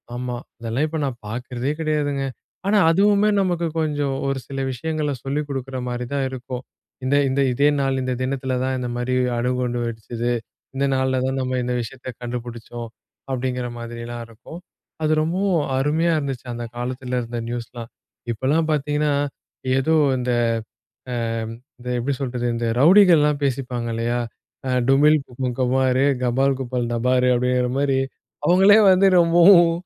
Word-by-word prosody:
ஆமா, 125 Hz, 0 st, -3 dB, 0.2 s
அதெல்லாம் 115 Hz, +5 st, -1 dB
இப்போ 160 Hz, +1 st, -3 dB
நான் 125 Hz, -3 st, -4 dB
பார்க்கறதே 125 Hz, +4 st, -3 dB
கிடையாதுங்க. 145 Hz, -3 st, 0 dB, 0.4 s
ஆனா 210 Hz, +1 st, +4 dB
அதுவுமே 205 Hz, +3 st, +4 dB
நமக்கு 175 Hz, -3 st, 0 dB
கொஞ்சம் 145 Hz, -3 st, 0 dB
ஒரு 135 Hz, -1 st, -1 dB
சில 135 Hz, -1 st, -5 dB
விஷயங்கள 150 Hz, +3 st, -2 dB
சொல்லிக் 145 Hz, +2 st, -2 dB
கொடுக்குற 135 Hz, -1 st, -4 dB
மாரி 120 Hz, 0 st, -3 dB
தான் 135 Hz, -1 st, 0 dB
இருக்கும். 125 Hz, 0 st, -6 dB, 0.4 s
"இந்த 135 Hz, +2 st, +2 dB
இந்த 135 Hz, +2 st, +1 dB
இதே 140 Hz, +4 st, +4 dB
நாள் 135 Hz, -1 st, 0 dB
இந்த 130 Hz, 0 st, -1 dB
தினத்துல 130 Hz, -1 st, -2 dB
தான் 130 Hz, 0 st, -1 dB
இந்த 125 Hz, -1 st, -3 dB
மாதிரி 125 Hz, +1 st, -1 dB, 0.2 s
அணுகுண்டு 125 Hz, 0 st, -1 dB
வெடிச்சது. 115 Hz, +1 st, -3 dB, 0.4 s
இந்த 140 Hz, -, +2 dB
நாள்ல 130 Hz, 0 st, +1 dB
தான் 135 Hz, 0 st, -1 dB
நம்ம 130 Hz, 0 st, -1 dB
இந்த 125 Hz, 0 st, -1 dB
விஷயத்த 125 Hz, +3 st, -10 dB, 0.2 s
கண்டுபிடிச்சோம்" 120 Hz, -1 st, -6 dB, 0.4 s
அப்படிங்கிற 125 Hz, -1 st, -2 dB
மாதிரிலாம் 120 Hz, 0 st, -6 dB
இருக்கும். 115 Hz, +9 st, -11 dB, 0.4 s
அது 155 Hz, 0 st, +3 dB
ரொம்பவும் 175 Hz, +2 st, +1 dB
அருமையா 155 Hz, +5 st, +2 dB
இருந்துச்சு, 135 Hz, -4 st, -4 dB
அந்த 120 Hz, 0 st, -5 dB
காலத்துல 125 Hz, +1 st, -3 dB
இருந்த 120 Hz, 0 st, -5 dB
நியூஸ்ல்லாம். 120 Hz, 0 st, -6 dB, 0.4 s
இப்பெல்லாம் 140 Hz, +8 st, +1 dB
பார்த்தீங்கன்னா, 150 Hz, 0 st, 0 dB, 0.7 s
ஏதோ 145 Hz, +4 st, +2 dB, 0.2 s
இந்த, 125 Hz, 0 st, -1 dB, 0.8 s
அ -, -, -2 dB, 0.7 s
இந்த 125 Hz, -, -11 dB
எப்படி 135 Hz, +4 st, -1 dB
சொல்றது 125 Hz, -2 st, -2 dB
இந்த 115 Hz, 0 st, -1 dB
ரவுடிகள்லாம் 160 Hz, -3 st, +6 dB
பேசிப்பாங்க 125 Hz, -3 st, -2 dB
இல்லையா! 120 Hz, +1 st, -1 dB, 0.5 s
அ -, -, 0 dB, 0.2 s
டுமில் 145 Hz, +3 st, +5 dB
குப்பம் 125 Hz, 0 st, -4 dB
கவ்வாறு, 130 Hz, +1 st, +2 dB, 0.2 s
கபால் 135 Hz, +2 st, +2 dB
குப்பம் 125 Hz, -2 st, -2 dB
தபாரு, 125 Hz, +2 st, +2 dB
அப்படிங்கிற 125 Hz, 0 st, +1 dB
மாரி 140 Hz, -1 st, +2 dB, 0.5 s
அவுங்களே 190 Hz, +4 st, +7 dB
வந்து 185 Hz, +1 st, +5 dB
ரொம்பவும் 170 Hz, +1 st, +6 dB
130 Hz, 145 wpm, -22 LUFS, 120-150 Hz, 0.8 s, அவுங்களே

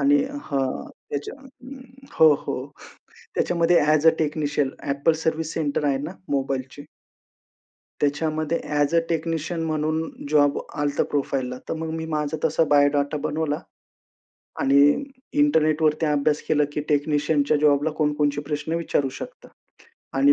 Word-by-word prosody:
आणि 285 Hz, 0 st, +4 dB, 0.2 s
हां 135 Hz, -2 st, -2 dB, 0.2 s
त्याच्या 145 Hz, 0 st, -4 dB, 0.8 s
हो 160 Hz, -2 st, +7 dB
हो -, -, -4 dB, 0.8 s
त्याच्यामध्ये 170 Hz, 0 st, +3 dB
as 155 Hz, 0 st, +3 dB
a -, -, +11 dB
technician 150 Hz, -2 st, 0 dB, 0.2 s
Apple 140 Hz, +3 st, +2 dB
service 160 Hz, 0 st, -1 dB
centre 150 Hz, -2 st, -1 dB
आहे 140 Hz, -1 st, +2 dB
ना 150 Hz, +5 st, -5 dB, 0.2 s
मोबाईलची. 135 Hz, 0 st, -2 dB, 1.2 s
त्याच्यामध्ये 155 Hz, +2 st, 0 dB, 0.2 s
ॲज 145 Hz, +2 st, +2 dB
अ -, -, +6 dB
टेक्निशियन 165 Hz, 0 st, -2 dB
म्हणून 155 Hz, 0 st, -1 dB, 0.2 s
जॉब 145 Hz, -1 st, +3 dB, 0.2 s
आलं 145 Hz, 0 st, 0 dB
होतं -, -, +1 dB
प्रोफाइलला. 135 Hz, -3 st, -1 dB
तर -, -, 0 dB
मग 160 Hz, 0 st, -4 dB
मी 160 Hz, -, -4 dB
माझा 155 Hz, -1 st, -2 dB
तसा 160 Hz, +1 st, +2 dB
बायोडाटा 145 Hz, 0 st, +3 dB
बनवला. 155 Hz, -1 st, -1 dB, 1.0 s
आणि 135 Hz, +1 st, +4 dB, 0.6 s
इंटरनेटवरती 155 Hz, -, +3 dB
अभ्यास 150 Hz, 0 st, +1 dB
केला 150 Hz, -1 st, +3 dB
की 150 Hz, -, -2 dB
टेक्निशियनच्या 150 Hz, 0 st, +2 dB
जॉबला 145 Hz, 0 st, +3 dB
कोणकोणते 145 Hz, -1 st, +1 dB
प्रश्न 150 Hz, +2 st, -3 dB
विचारू 145 Hz, -5 st, 0 dB
शकता. -, -, -9 dB, 0.7 s
आणि 140 Hz, +1 st, +6 dB
150 Hz, 125 wpm, -24 LUFS, 145-160 Hz, 1.2 s, अ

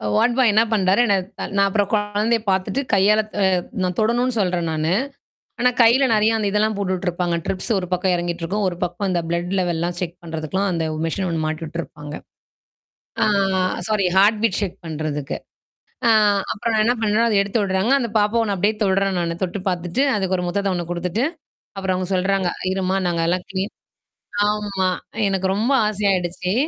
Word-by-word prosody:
வாட்பாய் 240 Hz, -, +3 dB
என்ன 220 Hz, -, +5 dB
பண்ணறாரு. 195 Hz, +1 st, +3 dB
என் 195 Hz, -4 st, +1 dB
த -, -, -4 dB
நான் 200 Hz, 0 st, +4 dB
அப்புறம் 200 Hz, 0 st, 0 dB
குழந்தைய 210 Hz, +2 st, +1 dB
பார்த்துட்டு 190 Hz, +8 st, 0 dB
கையாள 205 Hz, +2 st, +4 dB
த -, -, -4 dB, 0.4 s
நான் 180 Hz, -1 st, -1 dB
தொடணும்னு 240 Hz, +3 st, +1 dB
சொல்றேன் 180 Hz, -3 st, 0 dB
நானு. 155 Hz, +1 st, 0 dB, 0.7 s
ஆனா 250 Hz, +1 st, +4 dB
கையில 240 Hz, +4 st, +5 dB
நெறைய 220 Hz, +1 st, +3 dB
அந்த 215 Hz, -2 st, 0 dB
இதெல்லாம் 215 Hz, +1 st, +1 dB
போட்டுட்டுருப்பாங்க. 180 Hz, -3 st, -1 dB
ட்ரிப்ஸ் 190 Hz, +4 st, -2 dB
ஒரு 180 Hz, -, -5 dB
பக்கம் 180 Hz, 0 st, +1 dB
இறங்கிட்டுருக்கும். 175 Hz, +3 st, -2 dB
ஒரு 180 Hz, -, -2 dB
பக்கம் 175 Hz, +3 st, -2 dB
அந்த 180 Hz, -2 st, +1 dB
பிளட் 170 Hz, +1 st, -2 dB
லெவல்லாம் 175 Hz, -1 st, -1 dB
செக் 170 Hz, -1 st, -4 dB
பண்றதுக்குல்லாம் 165 Hz, +4 st, -2 dB
அந்த 165 Hz, -2 st, -1 dB, 0.2 s
மெஷின் 185 Hz, +3 st, -2 dB
ஒண்ணு 165 Hz, -1 st, -1 dB
மாட்டிட்டுருப்பாங்க. 155 Hz, -2 st, -5 dB, 1.1 s
ஆ, -, -, +6 dB, 0.6 s
சாரி 210 Hz, -2 st, +1 dB
ஹார்ட் 205 Hz, +3 st, +5 dB
பிட் 210 Hz, -4 st, +2 dB
ஷேக் 190 Hz, -2 st, -3 dB
பண்றதுக்கு. 150 Hz, -2 st, -3 dB, 0.7 s
ஆ -, -, +5 dB, 0.4 s
அப்புறம் 230 Hz, +2 st, -2 dB
நான் 215 Hz, -1 st, +3 dB
என்ன 240 Hz, -, +3 dB
பண்ணுவேன்னா, 220 Hz, +2 st, +2 dB
அத 215 Hz, -, +1 dB
எடுத்து 200 Hz, +3 st, -1 dB
விடுறாங்க. 190 Hz, +4 st, 0 dB
அந்த 235 Hz, -3 st, -2 dB
பாப்பா 210 Hz, +3 st, +2 dB
நான் 200 Hz, -, 0 dB
அப்படியியே 205 Hz, +4 st, +1 dB
தொடுறேன் 195 Hz, -1 st, +1 dB
நானு 170 Hz, -1 st, -1 dB
தொட்டு 185 Hz, +2 st, -2 dB
பார்த்துட்டு, 180 Hz, +6 st, -1 dB
அதுக்கு 190 Hz, -2 st, 0 dB
ஒரு 180 Hz, -, -2 dB
முத்தத 200 Hz, +2 st, 0 dB
ஒண்ணு 175 Hz, -1 st, -3 dB
குடுத்துட்டு. 180 Hz, +7 st, -1 dB, 0.5 s
அப்புறம் 190 Hz, -1 st, -1 dB
அங்க 185 Hz, 0 st, -2 dB
சொல்றாங்க 190 Hz, 0 st, +1 dB, 0.2 s
"இருமா 190 Hz, 0 st, 0 dB
நாங்க 170 Hz, -1 st, 0 dB
எல்லாம் 180 Hz, +1 st, 0 dB
கிளீன்" 195 Hz, +2 st, -3 dB, 0.8 s
ஆமா. 205 Hz, -3 st, -1 dB, 0.4 s
எனக்கு 190 Hz, -1 st, 0 dB
ரொம்ப 225 Hz, +6 st, 0 dB, 0.2 s
ஆச 210 Hz, -2 st, -3 dB
ஆயிடுச்சு. 180 Hz, 0 st, -1 dB
190 Hz, 170 wpm, -21 LUFS, 175-210 Hz, 1.1 s, ஆ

